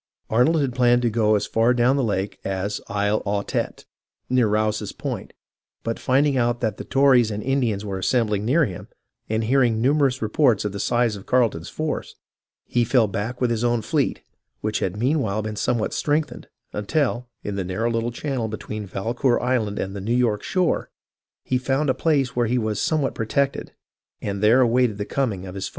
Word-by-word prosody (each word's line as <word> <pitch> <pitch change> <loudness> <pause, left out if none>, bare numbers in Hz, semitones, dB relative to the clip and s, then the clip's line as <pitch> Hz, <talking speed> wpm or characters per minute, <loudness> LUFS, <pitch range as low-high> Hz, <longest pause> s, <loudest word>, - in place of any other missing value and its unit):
Arnold 145 +8 +3
had 135 -3 -1
planned 120 -1 +3
to 120 - +2
go 110 -1 +3
as 105 - 0
far 115 +2 +2
down 125 +2 +3
the 140 - +1
lake 100 -3 -2
as 95 +2 -2
Isle 105 +1 0
Aux 100 0 -1
Tetes, - - -3 0.5
near 125 -3 +4
Rouse's 105 0 0
Point, - - -5 0.5
but 115 0 -3
finding 135 +1 +2
out 120 0 +1
that 110 -3 -1
the - - -6
Tories 130 -4 +4
and 105 0 -4
Indians 120 -7 0
were 95 -2 -3
assembling 105 -1 +1
near 145 +8 +3
him, 95 -7 -7 0.4
and 110 +1 0
hearing 120 -1 +2
numerous 135 +1 +2
reports 115 -1 +2
of 105 - -1
the 100 - -6
size 120 +1 +1
of 100 - -11
Carleton's 115 -10 +1
force, 155 -1 -4 0.5
he 120 - +1
fell 120 0 +3
back 105 +5 -4
with 125 -2 +1
his 115 0 -1
own 120 -2 +1
fleet, - - -1 0.4
which 110 0 -1
had 95 +1 -2
meanwhile 115 -4 0
been 110 0 -4
somewhat 115 +2 0
strengthened, 150 0 -1 0.3
until, 125 +2 -1
in 105 - -3
the 100 - -2
narrow 110 +6 -1
little 115 +1 -1
channel 130 -2 -3
between 110 -1 -6
Valcour 120 +6 0
Island 115 -5 0
and 95 +1 -3
the 100 - -5
New 115 +5 0
York 115 -4 +1
shore, 185 -2 0 0.5
he 125 - 0
found 135 +2 +1
a - - +1
place 140 -6 +1
where 120 -1 +2
he 125 +3 +1
was 110 -3 -1
somewhat 150 -4 +1
protected, 135 +5 -1 0.5
and 100 -1 -4
there 115 +5 +5
awaited 120 -3 +2
the 105 - -3
comins: 105 -9 -2
of 90 - -7
his 95 -1 -4
foe. - - -7
115 Hz, 195 wpm, -23 LUFS, 105-130 Hz, 0.5 s, there